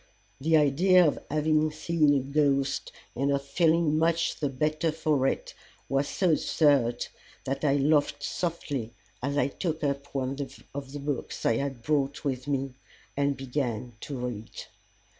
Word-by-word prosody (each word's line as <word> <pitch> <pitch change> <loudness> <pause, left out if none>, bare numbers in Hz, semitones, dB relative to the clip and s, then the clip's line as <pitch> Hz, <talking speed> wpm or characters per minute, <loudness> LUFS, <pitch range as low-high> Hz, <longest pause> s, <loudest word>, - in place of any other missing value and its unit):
The 160 +3 +4
idea 175 +5 +5
of 145 - 0
having 155 +1 +2
seen 155 -1 +2
a 135 - +2
ghost, 140 0 +1 0.2
and 140 +3 +1
of 140 0 0
feeling 160 +1 +2
much 165 +1 +1
the 145 - 0
better 155 +4 0
for 150 -4 +1
it, - - -2 0.3
was 135 +1 +1
so 185 -3 +1
absurd 140 -6 +2 0.4
that 135 +2 -3
I 140 -2 +3
laughed 145 0 +2
softly, 145 -9 -3 0.3
as 140 +3 -1
I - - +3
took 160 +2 -3
up 140 0 -1
one 135 0 -1 0.4
of 135 -1 -6
the 145 - -6
books 140 -2 -4
I 115 - +3
had 135 -3 -3
brought 140 -1 0
with 130 -1 -2
me 135 -2 -1 0.4
and 140 0 +1
began 125 -3 -3
to 140 +2 -6
read. 120 -3 -5
140 Hz, 155 wpm, -28 LUFS, 135-155 Hz, 0.4 s, idea